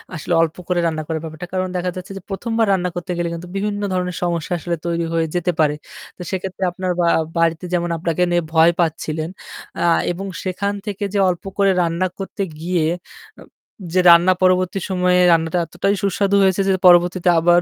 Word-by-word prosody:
আসলে 165 Hz, +2 st, -3 dB
অল্প 165 Hz, 0 st, 0 dB
করে 180 Hz, -1 st, +1 dB
রান্না 160 Hz, -1 st, -2 dB
করার 160 Hz, -1 st, -3 dB
ব্যাপারটা। 160 Hz, +2 st, -7 dB
কারণ 185 Hz, 0 st, 0 dB
দেখা 180 Hz, 0 st, -1 dB
যাচ্ছে 185 Hz, +1 st, -8 dB
যে -, -, -8 dB
১ম 205 Hz, +4 st, -4 dB
বার 225 Hz, -, +3 dB
রান্না 180 Hz, -1 st, 0 dB
করতে 175 Hz, +1 st, -5 dB
গেলে 170 Hz, 0 st, -1 dB
কিন্তু 170 Hz, +1 st, -7 dB
বিভিন্ন 205 Hz, +1 st, -2 dB
ধরনের 180 Hz, -1 st, -2 dB
সমস্যা 170 Hz, -1 st, -1 dB
আসলে 170 Hz, +1 st, -2 dB
তৈরি 170 Hz, 0 st, -1 dB
হয়ে 165 Hz, 0 st, +1 dB
যেতে 175 Hz, 0 st, +1 dB
পারে। 150 Hz, -1 st, +3 dB, 0.4 s
তো -, -, -10 dB
সেক্ষেত্রে 190 Hz, 0 st, -4 dB
আপনার 185 Hz, +1 st, -3 dB
বা 170 Hz, -, +2 dB, 0.3 s
বাড়িতে 165 Hz, +1 st, +1 dB
যেমন 175 Hz, -1 st, 0 dB
আপনাকে 165 Hz, +1 st, -2 dB
নিয়ে 175 Hz, -, +2 dB
ভয় 160 Hz, +1 st, +6 dB
পাচ্ছিলেন 160 Hz, -1 st, -1 dB, 0.8 s
এবং 185 Hz, +3 st, -5 dB
আ -, -, -5 dB
সেখান 200 Hz, +2 st, -2 dB
থেকে 205 Hz, 0 st, -4 dB
যে 200 Hz, -, +1 dB
অল্প 175 Hz, -2 st, -3 dB
করে 200 Hz, -1 st, +4 dB
রান্না 170 Hz, +2 st, 0 dB
করতে 195 Hz, +1 st, -5 dB, 0.2 s
গিয়ে 170 Hz, -1 st, 0 dB, 0.5 s
যে -, -, -13 dB
উম -, -, -20 dB, 0.5 s
যে 185 Hz, -, +3 dB
রান্না 170 Hz, +2 st, +7 dB
পরবর্তী 185 Hz, +1 st, +2 dB
সময়ে 180 Hz, -1 st, +2 dB
রান্নাটা 165 Hz, +1 st, +2 dB
এতটাই 175 Hz, +5 st, -1 dB
সুস্বাদু 200 Hz, 0 st, +1 dB
হয়েছে 190 Hz, 0 st, +2 dB
যে -, -, +3 dB, 0.2 s
পরবর্তীতে 175 Hz, +1 st, +4 dB
আবার 175 Hz, +1 st, +4 dB
175 Hz, 195 wpm, -20 LUFS, 170-185 Hz, 0.8 s, রান্না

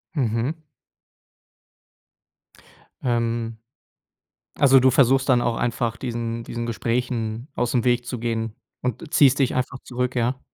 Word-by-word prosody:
Mhm. 120 Hz, +2 st, 0 dB, 2.5 s
Ähm. 115 Hz, -2 st, -1 dB, 1.0 s
Also, 135 Hz, -2 st, +6 dB
du 130 Hz, +1 st, +5 dB
versuchst 135 Hz, +1 st, +4 dB
dann 125 Hz, -2 st, +4 dB
auch 120 Hz, -1 st, 0 dB
einfach 120 Hz, -1 st, -1 dB
diesen 115 Hz, -2 st, -4 dB
diesen, 120 Hz, 0 st, -4 dB
Gesprächen 115 Hz, +1 st, -2 dB
aus 120 Hz, -1 st, 0 dB
dem 120 Hz, -3 st, +1 dB
Weg 120 Hz, -1 st, +2 dB
zu 125 Hz, -1 st, -4 dB
gehen 115 Hz, -1 st, -2 dB, 0.3 s
und 125 Hz, +7 st, -4 dB
ziehst 140 Hz, -1 st, +5 dB
dich 130 Hz, -, +2 dB
einfach 130 Hz, +1 st, -2 dB
zurück, 125 Hz, 0 st, -2 dB
ja? 125 Hz, +2 st, 0 dB
120 Hz, 125 wpm, -23 LUFS, 115-130 Hz, 2.5 s, Also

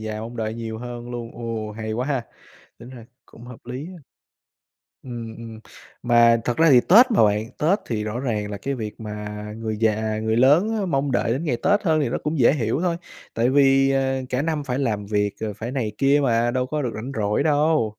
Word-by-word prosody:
già 110 Hz, 0 st, -5 dB
mong 115 Hz, +2 st, -7 dB
đợi 110 Hz, -1 st, -3 dB
nhiều 115 Hz, -1 st, -5 dB
hơn 120 Hz, 0 st, -7 dB
luôn. 120 Hz, -1 st, -6 dB
Ồ, 115 Hz, -2 st, -5 dB
hay 110 Hz, 0 st, -5 dB
quá 125 Hz, +4 st, -2 dB
ha! 135 Hz, -5 st, -2 dB, 0.5 s
Tính 120 Hz, -, -12 dB
ra 120 Hz, -3 st, -11 dB, 0.2 s
cũng 115 Hz, -, -15 dB
hợp 125 Hz, -2 st, -11 dB
lý 130 Hz, +5 st, -6 dB
á. 180 Hz, -1 st, -10 dB, 1.1 s
Ừm, 115 Hz, -3 st, -7 dB
ừm. 115 Hz, -1 st, -10 dB, 0.4 s
Mà 120 Hz, -1 st, +5 dB
thật 120 Hz, -, -1 dB
ra 165 Hz, -1 st, +5 dB
thì 125 Hz, -2 st, +7 dB
Tết 240 Hz, -, +6 dB
mà 215 Hz, -, +4 dB
bạn, 105 Hz, +2 st, 0 dB
Tết 180 Hz, +8 st, +2 dB
thì 105 Hz, -3 st, -2 dB
rõ 110 Hz, +3 st, -3 dB
ràng 105 Hz, -5 st, -2 dB
là 100 Hz, -, -4 dB
cái 135 Hz, +8 st, -3 dB
việc 110 Hz, -3 st, -6 dB
mà 105 Hz, -1 st, -6 dB, 0.3 s
người 110 Hz, -1 st, -4 dB
già, 110 Hz, 0 st, 0 dB
người 110 Hz, +1 st, 0 dB
lớn 150 Hz, -, +4 dB
á 195 Hz, -, -1 dB
mong 140 Hz, -4 st, 0 dB
đợi 115 Hz, -1 st, +1 dB
đến 135 Hz, +7 st, -2 dB
ngày 130 Hz, -7 st, 0 dB
Tết 205 Hz, +2 st, +3 dB
hơn 160 Hz, -5 st, +2 dB
thì 140 Hz, -, 0 dB
nó -, -, -2 dB
cũng 150 Hz, +1 st, -2 dB
dễ 125 Hz, +1 st, +5 dB
hiểu 125 Hz, +1 st, -1 dB
thôi. 175 Hz, -2 st, 0 dB, 0.4 s
Tại 120 Hz, +2 st, +2 dB
vì, 135 Hz, 0 st, +4 dB
ờ, 135 Hz, -1 st, 0 dB
cả 130 Hz, +2 st, -1 dB
năm 155 Hz, -3 st, -2 dB
phải 125 Hz, -1 st, -2 dB
làm 105 Hz, -7 st, -1 dB
việc 105 Hz, -1 st, 0 dB
rồi 110 Hz, -2 st, -3 dB
phải 115 Hz, +4 st, -6 dB
này 115 Hz, -6 st, -2 dB
kia 140 Hz, +2 st, +4 dB
mà, 120 Hz, -2 st, +2 dB
đâu 130 Hz, +1 st, -1 dB
có 150 Hz, +3 st, -2 dB
được 125 Hz, -, -1 dB
rảnh 125 Hz, +6 st, -6 dB
rỗi 105 Hz, +4 st, 0 dB
đâu. 150 Hz, -2 st, +2 dB
120 Hz, 230 wpm, -23 LUFS, 110-140 Hz, 1.1 s, thì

